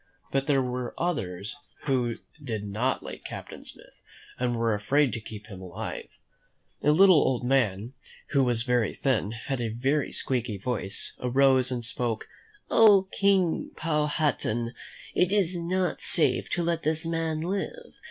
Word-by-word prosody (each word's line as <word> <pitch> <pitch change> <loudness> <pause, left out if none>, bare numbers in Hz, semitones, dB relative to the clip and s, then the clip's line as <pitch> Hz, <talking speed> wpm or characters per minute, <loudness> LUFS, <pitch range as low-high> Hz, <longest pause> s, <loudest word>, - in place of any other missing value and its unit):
But 135 0 0
there 135 -3 +3
were 125 -1 -4
others 110 - -2 0.3
who 125 -4 0 0.3
did 110 -6 -3
not 115 +6 -1
like - - -8
Captain - - -8
Smith - - -14 0.4
and 125 -1 0
were 115 -1 +1
afraid 130 +7 +2
to 115 - -3
keep 105 -1 -9
him 100 -4 -10
alive. 90 -2 -6 0.7
A - - +2
little 185 +3 +7
old 130 -2 +1
man, 120 -3 +1 0.4
who 140 -2 +3
was 120 -2 +1
very 120 -4 +1
thin, 135 -6 +1
and 105 - -5
had 125 +2 -3
a 115 - 0
very 135 +6 0
squeaky 120 -5 -1
voice, 100 -2 -2
arose 130 0 +3
and 120 -2 -3
spoke: 115 -1 -2 0.4
"Oh, 200 -4 +6
King 195 -4 +2
Powhatan, 150 -7 0 0.4
it 180 +1 +2
is 190 -4 +2
not 175 0 -1
safe - - +2
to 175 - 0
let 170 -1 0
this 160 +1 -1
man 165 -1 -1
live. 200 - -4
130 Hz, 150 wpm, -27 LUFS, 115-160 Hz, 0.7 s, little